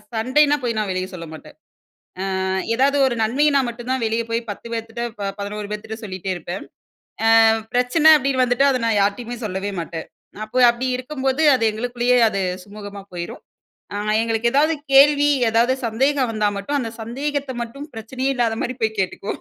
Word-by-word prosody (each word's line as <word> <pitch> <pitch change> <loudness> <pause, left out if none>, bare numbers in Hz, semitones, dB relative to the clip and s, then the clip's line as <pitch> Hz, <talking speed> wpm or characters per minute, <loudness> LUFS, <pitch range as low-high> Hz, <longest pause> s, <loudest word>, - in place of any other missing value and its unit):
சண்டைனா 285 +6 +3
போய் 230 -2 -1
நான் 210 -2 -2
வெளிய 185 0 -3
சொல்ல 170 -2 -7
மாட்டேன். 155 - -12 0.9
அ - - -1 0.3
ஏதாவது 280 +3 +3
ஒரு 240 - -3
நன்மையினா 280 +5 +3
மட்டும் 240 +1 -8
தான் 260 -3 -1
வெளியே 225 +1 -1
போய் 230 0 -2
10 230 +3 -11
பேர்திட்ட 225 +1 -4 0.4
11 205 +1 -5
பேர்திட்ட 220 +1 -6
சொல்லிட்டே 190 -1 -4
இருப்பேன். 175 +2 -6 0.8
ஆ - - +6 0.3
பிரச்சன 255 +6 +5
அப்டின்னு 265 -2 +1
வந்துட்டு 250 +3 +2
அதை 255 -2 0
நான் 220 -2 +2
யார்கிட்டயுமே 230 +4 -1
சொல்லவே 195 +1 -4
மாட்டேன். 165 -1 -7 0.4
அப்போ 215 +4 -3
அப்படி 240 +2 -3
இருக்கும்போது, 265 +2 -2
அது 230 - -1
எங்களுக்குள்ளேயே 245 +2 0
அது 200 - -2 0.3
சுமூகமா 205 -1 -9
போய்ரும். 170 -1 -6 0.5
ஆ - - -2 0.2
எங்களுக்கு 225 +1 0
ஏதாவது 305 +4 +3 0.2
கேள்வி, 290 +1 +6 0.2
ஏதாவது 230 +3 +3
சந்தேகம் 260 +3 +1
வந்தா 215 -2 0
மட்டும் 200 +9 -2
அந்த 235 -4 -3
சந்தேகத்த 275 +4 -3
மட்டும் 235 +5 -6
பிரச்சனையே 255 +4 -3
இல்லாத 235 -3 +1
மாரி 255 - -2
போய் 220 -1 0
கேட்டுக்குவோம். 190 +1 -3
235 Hz, 165 wpm, -21 LUFS, 210-260 Hz, 0.9 s, ஆ